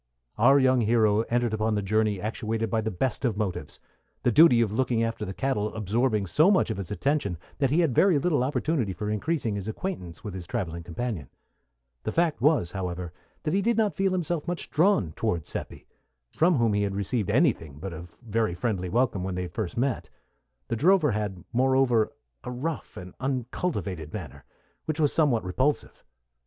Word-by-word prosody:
Our 135 +5 +6
young 130 -2 +4
hero 110 -1 +3
entered 120 -1 +1
upon 110 0 0
the 105 - -1
journey 105 0 +1
actuated 110 +1 -2
by 110 - +1
the 110 - -2
best 110 +6 -2
of 115 -6 0
motives, 105 -4 -3 0.4
the 120 - +3
duty 145 -2 +7
of 115 -3 +2
looking 115 0 +1
after 115 0 -2
the 95 - -5
cattle 110 -6 -1
absorbing 110 +1 0
so 155 - +4
much 190 - +3
of 110 - -3
his 95 -3 -5
attention 105 - 0 0.2
that 135 -2 +2
he 155 +6 +3
had 160 -7 +2
very 180 +4 +4
little 145 -3 +1
opportunity 130 - 0
for 105 +2 -3
increasing 115 +1 -1
his 100 0 -5
acquaintance 110 - -5
with 105 - -5
his 90 -3 -7
travelling 85 -8 -3
companion. 85 - -4 0.7
The 110 - -3
fact 165 -2 +1
was, 145 - +3
however, 90 -3 -4 0.3
that 155 - -1
he 195 - +2
did 230 +2 +1
not 215 -2 +2
feel 195 0 +1
himself 175 -3 -2
much 175 0 -4
drawn 150 - +3
toward 85 -4 -2
Seppi, - - -6 0.5
from 170 +2 +3
whom 115 -5 +2
he 105 - +1
had 100 -1 -1
received 100 +1 -1
anything 75 -4 +1
but 95 +4 -6
a 80 - -7 0.3
very 110 -4 0
friendly 90 -2 -2
welcome 115 -3 +1
when 95 -1 -3
they 90 0 -2
first 90 +3 -4
met; 130 0 -1 0.6
the - - -1
drover 160 - +4
had, 105 -5 -3
moreover, 130 -3 +3 0.3
a - - -5
rough 140 +6 -4
and 90 0 -9
uncultivated 120 - -3
manner, 90 - -8 0.4
which 155 0 -2
was 150 -2 +3
somewhat 145 -8 +3
repulsive. 130 +11 -1
115 Hz, 185 wpm, -27 LUFS, 100-140 Hz, 0.7 s, duty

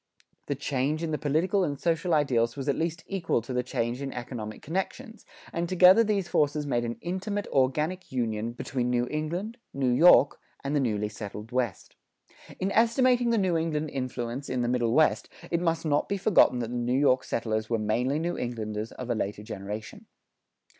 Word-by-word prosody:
The 145 - -1
change 140 +3 -1
in 160 - -2
the 150 - -1
political 170 +7 +1
and 145 -5 -2
social 170 +2 0
ideals 120 -6 +2
was 135 0 -4
at 140 - +2
least 165 0 -2
equal 185 -9 0
to 125 - -6
the 125 - +1
change 125 0 -2
in 135 -1 -4
economic 120 -3 -6
connections, 220 - -4 0.3
and 170 0 -2
together 185 +4 +7
these 205 -4 0
forces 150 -2 +1
made 120 -4 0
an 120 0 -3
intimate 195 +3 -3
organic 150 +7 0
union 115 -2 -2
between 125 0 -2
New 120 0 +1
England, 175 +10 -3 0.2
New 130 -2 +1
York, 145 +1 +6 0.2
and 140 +2 -1
the - - +3
newly 105 -5 0
settled 105 +1 -8
West. 120 -6 -2 0.6
In 190 +2 -1
estimating 240 +2 +3
the 230 - +2
New 185 -4 +1
England 155 -2 -1
influence 130 0 -4
in 125 -1 -1
the - - 0
Middle 120 -2 +1
West, 155 +3 +3 0.2
it 170 0 +1
must 165 -1 0
not 145 -1 +1
be 200 - 0
forgotten 190 -9 +4
that 115 0 -4
the 125 - -2
New 120 +2 0
York 130 -2 +3
settlers 110 -3 -2
were 115 - +1
mainly 120 +6 0
New 170 +2 -1
Englanders 110 -2 -4
of 125 -1 -5
a - - +3
later 105 -2 -3
generation. 105 0 -7
140 Hz, 190 wpm, -27 LUFS, 120-170 Hz, 0.6 s, together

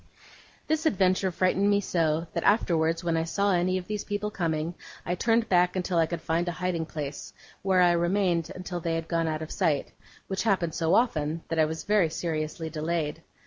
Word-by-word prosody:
This 315 +1 +1
adventure 190 - +2
frightened 185 +3 +2
me 200 0 +4
so, 165 -4 0
that, - - -2
afterwards, 165 -5 +2
when 170 -1 0
I 160 - +1
saw 200 +4 +1
any 180 +1 +1
of 180 - -5
these 210 +1 -3
people 205 0 -3
coming, 165 -3 -1 0.3
I 175 - -1
turned 230 +4 +2
back 180 0 +3
until 180 -2 0
I 165 - +3
could 170 -1 -4
find 165 +2 0
a 175 - -1
hiding 180 -2 -2
place, 145 -3 -6 0.3
where 190 -1 +3
I 175 -1 +6
remained 175 -1 +1
until 180 -1 -5
they 165 -1 -1
had 165 0 -3
gone 165 -1 0
out 155 0 -2
of 155 - -8
sight; 160 -8 0 0.3
which 190 -1 -2
happened 185 -7 +1
so 165 -2 +2
often, 160 -9 +1
that 165 - -1
I 155 - +5
was 160 +1 -4
very 205 -5 +3
seriously 160 0 -3
delayed. 155 0 -2
175 Hz, 200 wpm, -27 LUFS, 160-190 Hz, 0.3 s, I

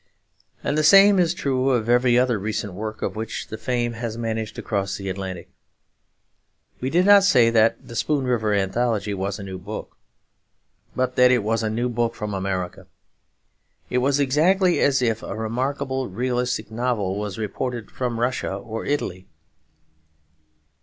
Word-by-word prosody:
And 145 - 0
the - - +2
same 195 +4 +7
is 170 -2 +3
true 135 -4 0
of 120 -4 +1
every 120 0 +4
other 125 -3 +2
recent 105 -1 -3
work 110 +3 -6
of - - -2
which 110 +1 -5
the - - -5
fame 120 -1 -1
has 115 -1 -5
managed 110 -2 -3
to - - -7
cross 100 -2 -2
the 100 -1 -5
Atlantic. 95 -2 -6 1.3
We 130 - -2
did 175 +5 +3
not 200 -1 +7
say 125 -12 +5
that 115 0 +2
The 120 - -9
Spoon 140 +3 0
River 115 -4 0
Anthology 105 +2 0
was 100 0 -3
a 100 - -8
new 95 -1 -7
book, 100 +4 -8 1.0
but 130 0 -1
that 125 0 +7
it 125 -4 +3
was 115 +2 0
a 110 - -1
new 120 +3 -1
book 120 -1 -1
from 105 -1 -4
America. 95 -2 -3 1.0
It 125 - +2
was 135 +2 +1
exactly 175 +7 +3
as 135 -2 +3
if 115 -2 0
a - - -6
remarkable 130 +4 -2
realistic 125 +1 -2
novel 110 -5 -1
was 105 -2 -4
reported 115 +1 -4
from 120 -3 -3
Russia 120 -5 -1
or 110 +3 -6
Italy. 95 -11 -3
115 Hz, 165 wpm, -23 LUFS, 105-130 Hz, 1.3 s, same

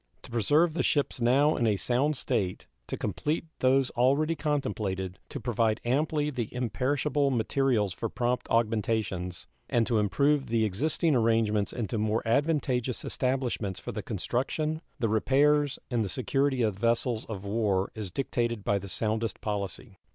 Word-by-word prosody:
To - - -12
preserve 150 +8 +3
the 170 - 0
ships 145 -4 0
now 140 +6 +4
in 120 - +1
a 105 - +3
sound 130 +9 +1
state, 95 -7 -1 0.2
to - - -4
complete 155 +2 -2
those 130 0 +3
already 140 +6 +2
contemplated, 105 - -2
to 145 - -5
provide 115 -2 +1
amply 150 +4 +1
the 120 -5 -3
imperishable 140 +4 0
materials 120 -4 +1
for 115 - -3
prompt 125 +2 -1
augmentations, 110 -6 0 0.2
and 115 -1 +2
to 115 -2 +1
improve 140 +8 +2
the 115 -1 +2
existing 150 - +1
arrangements 110 -3 +2
into 115 -2 -3
more 110 +2 0
advantageous 130 -2 +1
establishments 125 -7 -1
for - - -6
the - - -4
construction, 155 +5 -2 0.2
the 115 - 0
repairs, 140 +6 +3
and 120 -2 +1
the 100 - -3
security 135 +3 +1
of 105 -4 -1
vessels 115 0 +1
of 100 -3 -6
war 100 -2 0
is 105 -4 -5
dictated 120 0 -2
by 100 0 +1
the 100 +1 -8
soundest 110 +4 -1
policy. 100 0 -4
120 Hz, 150 wpm, -28 LUFS, 110-140 Hz, 0.2 s, now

